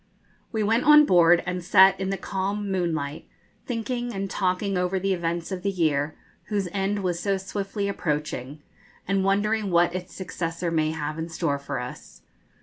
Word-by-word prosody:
We 220 -2 0
went 225 +4 +2
on 300 0 +8
board, 175 -5 +5
and 180 0 -3
sat 190 +1 +6
in 190 0 -2
the 195 - -1
calm 200 +2 -3
moonlight, 160 -5 -2 0.4
thinking 240 0 -3
and 195 -1 -3
talking 190 +1 0
over 180 +1 0
the 195 +1 0
events 170 0 -2
of 185 -1 -3
the 200 - 0
year, 155 -5 0 0.3
whose 200 -3 -1
end 200 +1 -1
was 175 -2 -1
so 195 +1 0
swiftly 200 +1 -3
approaching, 150 -5 -3 0.4
and 195 0 +1
wondering 205 +2 +1
what 175 0 +3
its 180 0 -6
successor 170 -2 -3
may 155 -1 +1
have 155 0 -4
in 165 +1 -4
store 160 -3 -1
for 140 -1 -4
us. 125 0 -9
185 Hz, 170 wpm, -25 LUFS, 165-200 Hz, 0.4 s, on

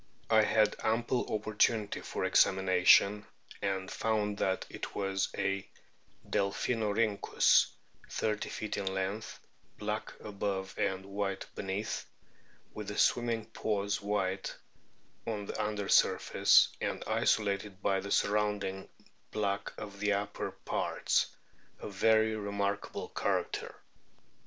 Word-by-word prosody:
I 110 0 +7
had 105 0 +3
ample 120 +3 0
opportunity 110 0 +1
for - - -4
examina 95 -1 +3
tion, 105 +1 +7 0.4
and 95 -1 -2
found 105 -2 -1
that 95 0 0
it - - -7
was 95 -1 0
a 95 0 -1 0.6
Delpkinorkynckus, 105 +1 +2 0.4
thirty 105 -1 -1
feet 110 - -4
in 95 -1 -1
length, 95 +3 -3 0.4
black - - -3
above 100 -2 -3
and 95 0 -1
white 100 -1 -3
beneath, 100 +2 -3 0.7
with 105 -2 -6
the 105 - -5
swimming 115 -2 +2
paws 105 0 -1
white 95 -2 -1 0.7
on 105 -3 -2
the 110 - -3
under 105 -1 -2
surface, - - +5
and - - -2
isolated 100 -2 0
by 95 -1 +2
the 100 +1 -6
surrounding 100 -2 0 0.4
black 100 -2 -2
of 100 -1 -8
the 105 0 +2
upper 100 +1 -2
parts - - 0 0.5
a - - -6
very 110 +2 +3
remarkable 100 -1 -3
character. - - -2
100 Hz, 115 wpm, -32 LUFS, 100-105 Hz, 0.7 s, I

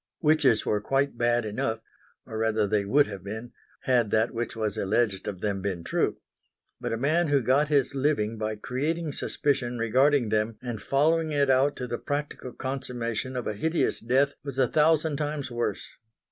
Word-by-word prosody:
Witches 150 -7 +3
were 105 - 0
quite 135 +4 0
bad 120 0 +1
enough; 110 +1 -2 0.5
or 110 - -6
rather 110 -1 +2
they 100 0 0
would 140 +8 +4
have 100 -3 -8
been, 110 +4 -6 0.3
had 120 -4 +2
that 110 +2 +1
which 120 0 -3
was 110 -3 -2
alleged 100 -1 0
of 95 -3 -5
them 100 -2 -1
been 95 -4 -3
true. - - 0 0.6
But - - -3
a 115 - -1
man 155 +7 +2
who 140 -3 +2
got 135 +5 +3
his 145 -2 +2
living 130 -6 0
by 110 0 -2
creating 150 +9 -2
suspicion 125 -3 -1
regarding 130 +2 +3
them 110 +1 0
and 120 -4 -5
following 155 +7 +2
it 140 -2 +3
out 135 +2 +3
to 125 - -4
the 120 -1 -4
practical 145 -3 -4
consummation 130 -2 -4
of 125 - -3
a - - -1
hideous 160 +11 0
death, 135 +4 +2
was 140 -2 -6
a 130 -2 +4
thousand 155 +1 +2
times 145 -3 -3
worse. 120 0 -2
125 Hz, 180 wpm, -27 LUFS, 110-145 Hz, 0.6 s, would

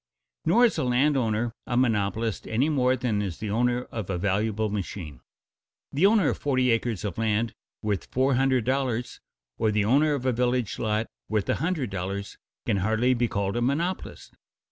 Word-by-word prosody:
Nor 230 +10 +5
is 235 - +1
a - - +1
land 130 +4 +3
owner 115 -2 0
a 120 - 0
monopolist 110 -2 0
any 125 +7 +1
more 130 -4 +2
than 115 -5 -1
is 95 -5 -4
the 105 -1 -4
owner 120 +2 +1
of 110 -5 -5
a 95 - -1
valuable 105 +3 0
machine. 95 -6 -5 0.7
The 160 +8 +5
owner 205 -6 +4
of - - -3
forty 130 -3 +2
acres 115 -3 -1
of 100 0 -4
land 110 +1 0 0.3
worth 105 -4 -1
four 130 +2 +1
hundred 130 -1 +2
dollars, 130 -2 -1 0.4
or 110 - +2
the 105 -1 +1
owner 145 +6 +3
of 130 -2 -5
a 130 - +3
village 125 -2 0
lot 110 0 0 0.2
worth 105 -2 0
a - - +3
hundred 160 - -1
dollars, 100 +2 -4 0.3
can 100 - +1
hardly 110 +6 +2
be 120 -1 +1
called 100 -2 -2
a 120 - 0
monopolist. 165 +9 -2
115 Hz, 185 wpm, -26 LUFS, 105-130 Hz, 0.7 s, Nor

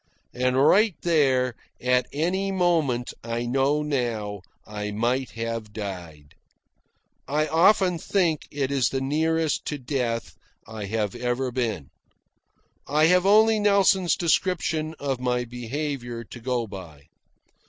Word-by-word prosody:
And 125 +1 0
right 195 +8 +4
there, 135 -7 +2 0.3
at 125 0 +1
any 185 +6 -1
moment, 165 -10 +1
I 115 +1 -3
know 135 +4 +1
now, 115 -8 -2 0.2
I 105 0 -5
might 120 +5 -1
have 115 -2 -4
died. 90 -9 -7 0.9
I 150 +2 +1
often 180 +1 +3
think 170 -6 0
it 140 -1 -2
is 135 -3 +2
the 135 - -2
nearest 160 +3 0
to 150 - -3
death 125 -3 -3 0.3
I 110 -2 -6
have 105 -1 -2
ever 125 +1 -2
been. 110 - -3 1.0
I 150 +2 +3
have 180 +1 +3
only 220 +2 +5
Nelson's 200 -3 +3
description 165 -2 0
of 135 -3 -2
my 125 -1 0
behaviour 120 0 -5
to 120 - -11
go 120 0 -1
by. 90 -8 -10
130 Hz, 125 wpm, -25 LUFS, 115-160 Hz, 1.0 s, only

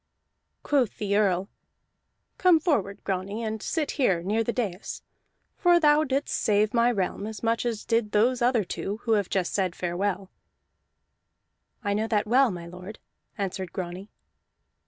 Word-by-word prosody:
Quoth 270 -6 +1
the 200 -1 -1
Earl: 195 -2 +2 0.9
"Come 360 -3 +5
forward, 210 - -1
Grani, 195 +4 -3
and 220 -1 -3
sit 305 +4 -1
here 180 -9 +2
near 215 +5 +1
the 235 - -1
dais; 205 -6 -4 0.5
for 350 -2 +4
thou 300 -1 +5
didst 275 0 -1
save 210 0 +2
my 240 0 +4
realm 200 -1 -2
as 220 -1 -8
much 230 +1 +1
as 225 -3 -3
did 230 -2 +1
those 240 +4 +2
other 240 -2 +3
two 195 +3 -4
who 230 - -1
have 205 -4 +2
just 185 -3 -1
said 185 -3 0
farewell." 185 +2 -2 1.5
"I 205 -1 0
know 215 +2 0
that 210 -2 +1
well, 255 +4 +4
lord," 180 +3 -8 0.4
answered 190 -3 -3
Grani. 185 +2 -6
210 Hz, 150 wpm, -26 LUFS, 190-240 Hz, 1.5 s, Come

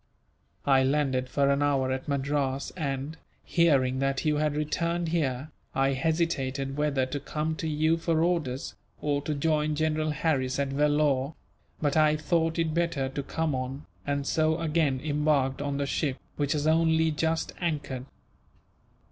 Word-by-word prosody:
I 135 -2 +5
landed 130 -2 +1
for 140 0 +2
an 140 +1 +1
hour 135 -2 +2
at 130 +2 -3
Madras 140 -1 -1
and, 140 -1 -3 0.3
hearing 135 -6 +3
that 135 +2 0
you 150 -1 +2
had 150 -1 +1
returned 170 +3 -1
here, 145 -3 -1 0.2
I 135 0 +2
hesitated 135 -3 -1
whether 145 -3 +1
to 135 +2 -4
come 155 +3 -2
to 160 - -3
you 155 +2 +2
for 165 -1 +1
orders, 155 -7 -1 0.3
or 145 -1 0
to 150 +1 -2
join 150 +1 +1
General 155 0 0
Harris 140 -4 0
at 140 -1 0
Vellore; 145 0 +1 0.4
but 145 -2 0
I 155 -1 +5
thought 165 +1 0
it 165 -2 0
better 165 -5 0
to 140 +1 -3
come 160 +2 -2
on, 130 +2 -4 0.2
and 140 -1 -1
so 160 +2 +1
again 155 -4 +1
embarked 145 -3 +1
on 140 -1 -2
the 140 - 0
ship, 140 -1 -1 0.2
which 145 0 0
has 150 -1 -1
only 160 0 +3
just 160 +2 -1
anchored." 145 -6 -2
150 Hz, 155 wpm, -28 LUFS, 135-160 Hz, 0.4 s, I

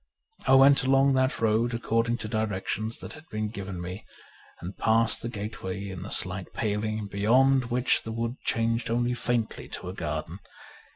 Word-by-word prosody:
I 135 - +7
went 135 +1 +7
along 135 +1 +4
that 130 0 +1
road 115 +2 +2
according 115 0 0
to 110 - -5
directions 110 +1 -2
that - - -8
had 160 +1 -14
been 110 0 -2
given 100 -4 -6
me, 90 +4 -6 0.6
and 90 +3 -7
passed 115 0 +2
the 115 - -3
gateway 100 -3 -5
in 95 -2 -6
a 105 - -7
slight 95 0 -1
paling, 110 0 -1
beyond 125 +7 +3
v/hich 125 +1 +2
the 110 - -6
wood 115 +3 -3
changed 115 +1 0
only 120 +1 +1
faintly 120 -2 -2
to - - -7
a - - -5
garden. - - -4
115 Hz, 170 wpm, -27 LUFS, 105-120 Hz, 0.6 s, I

